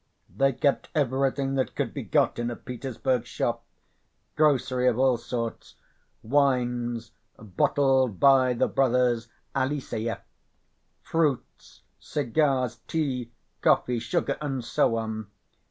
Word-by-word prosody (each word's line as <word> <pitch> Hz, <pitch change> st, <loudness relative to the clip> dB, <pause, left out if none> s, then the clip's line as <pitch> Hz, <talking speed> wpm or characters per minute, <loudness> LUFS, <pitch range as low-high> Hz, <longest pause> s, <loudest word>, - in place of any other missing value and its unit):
They 135 Hz, +5 st, +3 dB
kept 140 Hz, +3 st, 0 dB
everything 135 Hz, -1 st, +1 dB
that 130 Hz, -1 st, -1 dB
could -, -, -2 dB
be -, -, -4 dB
got -, -, +1 dB
in 120 Hz, 0 st, -1 dB
a 120 Hz, -, -4 dB
Petersburg 125 Hz, 0 st, -3 dB
shop, 120 Hz, -1 st, -2 dB, 0.7 s
grocery 130 Hz, -4 st, +2 dB
of 120 Hz, -2 st, +2 dB
all 130 Hz, -1 st, +3 dB
sort, 115 Hz, -1 st, -5 dB, 0.5 s
wines 120 Hz, -3 st, 0 dB, 0.3 s
"bottled 130 Hz, +2 st, +1 dB
by 130 Hz, -2 st, +5 dB
the 120 Hz, -, +1 dB
brothers 125 Hz, -3 st, +2 dB, 0.3 s
Eliseyev," 130 Hz, -4 st, -2 dB, 0.8 s
fruits, 155 Hz, -6 st, -2 dB, 0.2 s
cigars, 135 Hz, -3 st, 0 dB
tea, 130 Hz, -7 st, -2 dB, 0.3 s
coffee, 125 Hz, -1 st, +2 dB
sugar, 160 Hz, +9 st, -1 dB
and 135 Hz, -5 st, -3 dB
so 115 Hz, -1 st, +2 dB
on. 110 Hz, -2 st, -4 dB
125 Hz, 110 wpm, -26 LUFS, 120-135 Hz, 0.8 s, by